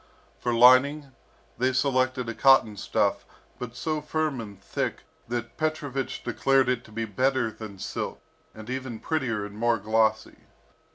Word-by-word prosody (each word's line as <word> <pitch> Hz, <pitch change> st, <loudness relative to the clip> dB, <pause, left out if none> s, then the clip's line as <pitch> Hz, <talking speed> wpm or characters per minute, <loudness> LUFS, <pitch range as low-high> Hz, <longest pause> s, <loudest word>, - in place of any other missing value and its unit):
For 120 Hz, -, -1 dB
lining, 130 Hz, +4 st, +5 dB, 0.5 s
they 130 Hz, +1 st, +2 dB
selected 130 Hz, -1 st, +1 dB
a 115 Hz, -, -3 dB
cotton 135 Hz, -4 st, +5 dB
stuff, -, -, 0 dB, 0.4 s
but 120 Hz, -1 st, -6 dB
so 155 Hz, +2 st, -2 dB
firm 150 Hz, -3 st, -1 dB
and 100 Hz, -3 st, -10 dB
thick, 95 Hz, -, -3 dB, 0.3 s
that 120 Hz, 0 st, -4 dB
Petrovich 145 Hz, -4 st, -2 dB
declared 135 Hz, -1 st, +2 dB
it 125 Hz, -1 st, 0 dB
to 110 Hz, -, -16 dB
be 115 Hz, +1 st, -3 dB
better 130 Hz, +2 st, 0 dB
than 105 Hz, -3 st, -9 dB
silk, -, -, -4 dB, 0.4 s
and 110 Hz, 0 st, -10 dB
even 130 Hz, -2 st, -4 dB
prettier 125 Hz, -10 st, -1 dB
and 100 Hz, 0 st, -10 dB
more 115 Hz, +1 st, +2 dB
glossy. 110 Hz, +1 st, 0 dB
125 Hz, 150 wpm, -26 LUFS, 110-135 Hz, 0.5 s, lining